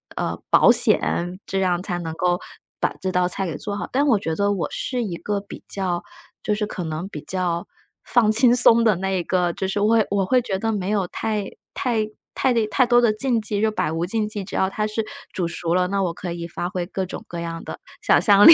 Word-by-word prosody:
呃， -, -, -3 dB
保 -, -, +7 dB
险， 175 Hz, +2 st, +3 dB
这 195 Hz, -, -2 dB
样 180 Hz, -2 st, +1 dB
才 180 Hz, -2 st, -3 dB
能 165 Hz, -2 st, -5 dB
够 175 Hz, +1 st, +1 dB, 0.4 s
把 -, -, +1 dB
这 190 Hz, -1 st, -1 dB
道 180 Hz, 0 st, +2 dB
菜 195 Hz, +2 st, -1 dB
给 165 Hz, -5 st, -4 dB
做 205 Hz, -1 st, -4 dB
好。 -, -, -4 dB
但 280 Hz, +3 st, +2 dB
我 230 Hz, -7 st, +4 dB
觉 160 Hz, -4 st, -2 dB
得 200 Hz, +2 st, +1 dB
我 195 Hz, -4 st, -1 dB
是 250 Hz, -2 st, -2 dB
一 180 Hz, -, -4 dB
个 205 Hz, +4 st, -2 dB
比 200 Hz, -, -11 dB
较 180 Hz, -3 st, -1 dB, 0.4 s
就 210 Hz, -, 0 dB
是 210 Hz, 0 st, -1 dB
可 185 Hz, -, -5 dB
能 160 Hz, +2 st, -4 dB
比 155 Hz, -7 st, -8 dB
较 175 Hz, -1 st, -2 dB, 0.4 s
放 235 Hz, -3 st, +3 dB
轻 240 Hz, +2 st, +6 dB
松 235 Hz, -1 st, +6 dB
的 220 Hz, -3 st, +4 dB
那 190 Hz, +1 st, -2 dB
一 185 Hz, -2 st, 0 dB
个， 175 Hz, -1 st, 0 dB
就 190 Hz, -, -3 dB
是 200 Hz, -, -1 dB
我 210 Hz, -, +2 dB
会 225 Hz, -2 st, +4 dB
我 200 Hz, -1 st, +1 dB
会 250 Hz, +6 st, +3 dB
觉 195 Hz, -5 st, -3 dB
得 225 Hz, +2 st, 0 dB
没 195 Hz, -2 st, -2 dB
有 200 Hz, -3 st, 0 dB
太 215 Hz, +1 st, -2 dB, 0.3 s
太 230 Hz, -5 st, 0 dB, 0.3 s
太 260 Hz, -, +2 dB
太 255 Hz, +4 st, +3 dB
多 240 Hz, 0 st, +5 dB
的 230 Hz, -3 st, +3 dB
禁 240 Hz, +1 st, +1 dB
忌， 210 Hz, -1 st, -1 dB
就 220 Hz, -, +2 dB
百 210 Hz, -, -1 dB
无 165 Hz, +2 st, -1 dB
禁 215 Hz, +3 st, 0 dB
忌， 210 Hz, -2 st, -4 dB
只 190 Hz, -, -8 dB
要 190 Hz, -, +2 dB
它 210 Hz, +2 st, -2 dB
是 215 Hz, +1 st, -2 dB, 0.3 s
煮 180 Hz, -3 st, -2 dB
熟 170 Hz, 0 st, -2 dB
了， 180 Hz, 0 st, +2 dB
那 195 Hz, 0 st, 0 dB
我 175 Hz, -3 st, -1 dB
可 175 Hz, 0 st, -5 dB
以 170 Hz, 0 st, -5 dB
发 175 Hz, +1 st, -4 dB
挥 180 Hz, -1 st, -3 dB
各 190 Hz, +1 st, -3 dB
种 -, -, -7 dB
各 170 Hz, -, -6 dB
样 165 Hz, 0 st, -5 dB
的 -, -, -7 dB, 0.2 s
想 -, -, +4 dB
象 205 Hz, -1 st, +6 dB
力， 330 Hz, -, +13 dB
195 Hz, 265 characters per minute, -22 LUFS, 175-215 Hz, 0.4 s, 力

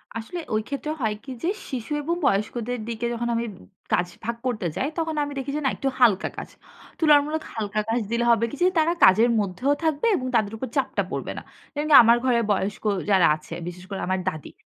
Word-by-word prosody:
আসলে 230 Hz, +11 st, -5 dB
ঐ -, -, +2 dB
ক্ষেত্রে 285 Hz, +2 st, -4 dB
হয় 215 Hz, -2 st, 0 dB
কি? 275 Hz, -, -8 dB
যে, -, -, 0 dB, 0.2 s
শিশু 250 Hz, 0 st, -5 dB
এবং 335 Hz, +4 st, 0 dB
বয়স্কদের 230 Hz, +4 st, 0 dB
দিকে 235 Hz, 0 st, -3 dB
যখন 235 Hz, 0 st, -2 dB
আমি 230 Hz, +1 st, -1 dB, 0.5 s
কাজ 180 Hz, -, +2 dB, 0.2 s
ভাগ 235 Hz, +1 st, -2 dB
করতে 225 Hz, -7 st, -2 dB
যাই, 270 Hz, -, 0 dB
তখন 325 Hz, -1 st, -1 dB
আমি 290 Hz, -, -5 dB
দেখি 270 Hz, +1 st, -3 dB
যে, -, -, -3 dB
না, -, -, +4 dB
একটু 275 Hz, -, -2 dB
হালকা 220 Hz, -6 st, +4 dB
কাজ। -, -, -6 dB, 0.5 s
তুলনামূলক 305 Hz, 0 st, +3 dB
হালকা 215 Hz, -1 st, -2 dB
কাজ 230 Hz, +2 st, +1 dB
দিলে 235 Hz, 0 st, +1 dB
হবে 230 Hz, 0 st, +3 dB
কি? -, -, -6 dB
যে, -, -, +6 dB
তারা 325 Hz, +2 st, +3 dB
কাজের 220 Hz, +6 st, +6 dB
মধ্যেও 210 Hz, +8 st, 0 dB
থাকবে 315 Hz, +4 st, +1 dB
এবং 255 Hz, -, -3 dB
তাদের 215 Hz, -2 st, +1 dB
উপর 260 Hz, -, -4 dB
চাপটা -, -, 0 dB
পড়বে -, -, -3 dB
না। -, -, -5 dB, 0.3 s
যেমন 295 Hz, +1 st, -2 dB
কি? -, -, +4 dB
আমার 230 Hz, +1 st, +6 dB
ঘরে 245 Hz, -2 st, +3 dB
বয়স্ক 200 Hz, 0 st, -1 dB, 0.3 s
যারা 190 Hz, -4 st, +6 dB
আছে, 155 Hz, 0 st, -11 dB
বিশেষ 180 Hz, +1 st, -8 dB
করে 195 Hz, -, -4 dB
আমার 185 Hz, 0 st, 0 dB
দাদী। 155 Hz, -5 st, -9 dB
235 Hz, 215 wpm, -24 LUFS, 210-285 Hz, 0.5 s, যে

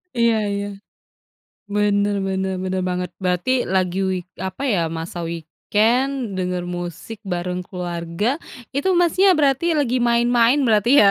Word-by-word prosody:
Iya 235 Hz, -1 st, +3 dB, 0.2 s
iya. 200 Hz, 0 st, -2 dB, 1.1 s
Bener 205 Hz, 0 st, +2 dB
bener 190 Hz, 0 st, -1 dB
bener 185 Hz, 0 st, -1 dB
banget, 180 Hz, -1 st, -2 dB
berarti 180 Hz, +4 st, 0 dB, 0.2 s
lagi 185 Hz, -1 st, +1 dB
week 180 Hz, -2 st, -4 dB, 0.2 s
apa 190 Hz, +6 st, -8 dB
ya, 190 Hz, -, +2 dB, 0.2 s
masa 165 Hz, +2 st, -6 dB
weekend, 215 Hz, -, 0 dB, 0.3 s
denger 180 Hz, -1 st, -2 dB
musik 175 Hz, +5 st, -6 dB
bareng 180 Hz, +1 st, -2 dB
keluarga, 175 Hz, 0 st, -4 dB, 0.5 s
itu 285 Hz, +7 st, +1 dB
Masnya 355 Hz, +3 st, +4 dB
berarti 275 Hz, +1 st, +2 dB
lagi 255 Hz, -4 st, +1 dB
main-main 235 Hz, +2 st, +4 dB
berarti 215 Hz, 0 st, +3 dB
ya? 205 Hz, -, +7 dB
190 Hz, 130 wpm, -21 LUFS, 180-235 Hz, 1.1 s, ya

